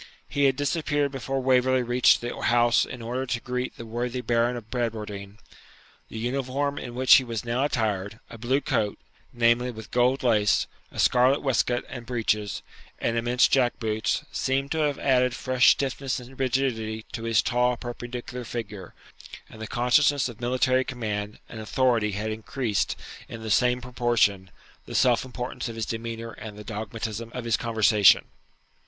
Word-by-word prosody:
He 140 0 +1
had 135 -1 +3
disappeared 145 0 0
before 135 0 -3
Waverley 130 0 +3
reached 120 +1 +4
the 120 0 -4
house 120 0 +4
in 120 -2 -8
order 125 +3 -3
to 120 0 -1
greet 125 +1 -4
the 115 - -8
worthy 120 +2 -3
Baron 120 +1 +1
of 110 -2 -11
Bradwardine. 105 -4 -4 0.7
The - - -8
uniform 135 +4 -2
in 120 -1 -7
which 130 +1 +5
he 130 - +1
was 115 -2 -4
now 120 +3 0
attired, 110 -5 -2
a 115 - -11
blue 130 +5 +1
coat, 105 -6 -1 0.3
namely, 120 +1 +2
with 110 -3 -9
gold 125 +2 +2
lace, 105 -5 +3 0.3
a - - -13
scarlet 130 +3 +3
waistcoat 125 -2 +1
and 120 -2 -8
breeches, 105 -5 -1 0.3
and 115 - -1
immense 120 +2 +3
jack 125 -3 +2
boots, 110 -1 -1
seemed 135 +1 -1
to 160 - 0
have 150 -2 +1
added 125 -2 +2
fresh 130 -1 +3
stiffness 135 -1 0
and 125 +2 -13
rigidity 120 -4 -1
to 115 - -5
his 115 -1 +3
tall, 125 0 +1
perpendicular 120 0 -6
figure; 105 -6 -7 0.6
and 110 - -12
the 110 - -5
consciousness 130 +4 +3
of 120 -2 -10
military 130 +1 +2
command 105 -5 -4
and 115 - -9
authority 115 -2 +1
had 105 +2 -3
increased, 110 0 -2 0.3
in 115 - -8
the 110 - -3
same 125 +3 +3
proportion, 120 -6 +1 0.4
the - - -7
self 125 -3 +3
importance 125 -1 -5
of 115 - -7
his 115 -1 -2
demeanour 115 0 -5
and 105 -1 -9
the 105 - -9
dogmatism 110 +1 -5
of 125 -2 -5
his 115 -1 +2
conversation. 110 -3 +4
120 Hz, 165 wpm, -26 LUFS, 110-130 Hz, 0.7 s, which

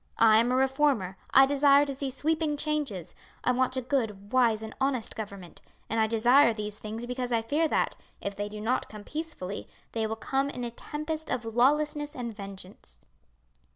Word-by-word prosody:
"I 220 -1 +6
am 235 +2 +2
a - - +2
reformer; 265 -7 +2 0.2
I 270 - +8
desire 285 +1 +5
to 280 - -3
see 270 0 -3
sweeping 305 +3 0
changes; 285 - -2 0.3
I - - +3
want 255 +1 +1
a 260 - -1
good, 220 -6 -2
wise, 230 -4 +3
and 220 - -7
honest 265 -4 0
government; 200 -5 -8 0.3
and 225 - +1
I 220 - +3
desire 230 +2 +5
these 210 0 -5
things 220 +2 -6
because 250 0 -3
I 230 -1 +1
fear 300 +7 +1
that, - - 0 0.2
if 200 0 -4
they 205 +1 -3
do 210 0 -7
not 230 +4 -1
come 210 -1 -9
peacefully 300 - -6 0.2
they 225 -1 -1
will 220 - -3
come 270 +5 -1
in 250 -3 -5
a 240 - -3
tempest 305 +5 -5
of 245 -2 -2
lawlessness 295 +5 +1
and 235 -3 -5
vengeance." 195 - -10
245 Hz, 190 wpm, -28 LUFS, 215-280 Hz, 0.3 s, I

